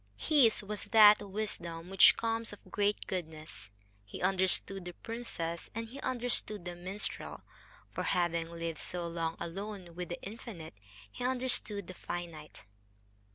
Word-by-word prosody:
His 260 -9 +4
was 210 +1 -5
that 210 -2 +8
wisdom 190 -4 -4
which 195 - +8
comes 230 0 -1
of 205 - -13
great 205 0 +1
goodness. 155 - -6 0.3
He 100 - -9
understood 190 0 +2
the 180 - -6
princess, 170 -7 -4
and 230 0 -4
he 270 +4 -9
understood 240 -6 0
the 175 0 -5
minstrel; 185 +4 -5 0.5
for, - - -3
having 170 -2 +1
lived 165 -1 -4
so 175 -1 -2
long 165 -1 -2
alone 185 +1 -6
with 180 0 -5
the 175 - -4
Infinite, 200 - -8 0.4
he - - -7
understood 245 -6 +1
the 185 - -8
Finite. 170 -4 -7
190 Hz, 140 wpm, -32 LUFS, 170-215 Hz, 0.5 s, that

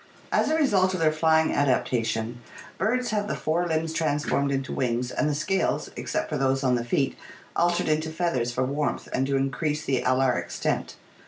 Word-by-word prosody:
As - - +2
a 315 - +2
result 190 -11 +3
of - - -3
their 160 -1 +4
flying 160 0 +3
adaptation, 120 -3 0 0.4
birds 245 +6 0
have 205 -1 0
the - - -2
fore 170 +3 0
limbs 160 0 -1
transformed 145 -3 0
into 135 -1 -2
wings, 125 -1 -1
and 150 - 0
the 150 - 0
scales, 185 +6 0
except - - -2
for 150 -3 -2
those 135 0 +1
on 130 -1 +3
the 120 -1 +1
feet, 135 +3 0 0.4
altered 175 0 +2
into 155 +1 +1
feathers 160 -8 -1
for 125 +2 0
warmth 145 +3 -2
and 135 +1 +1
to 140 - 0
increase 145 +3 -1
the 130 -3 +1
alar 130 -4 +2
extent. 85 - -3
145 Hz, 185 wpm, -26 LUFS, 130-165 Hz, 0.4 s, their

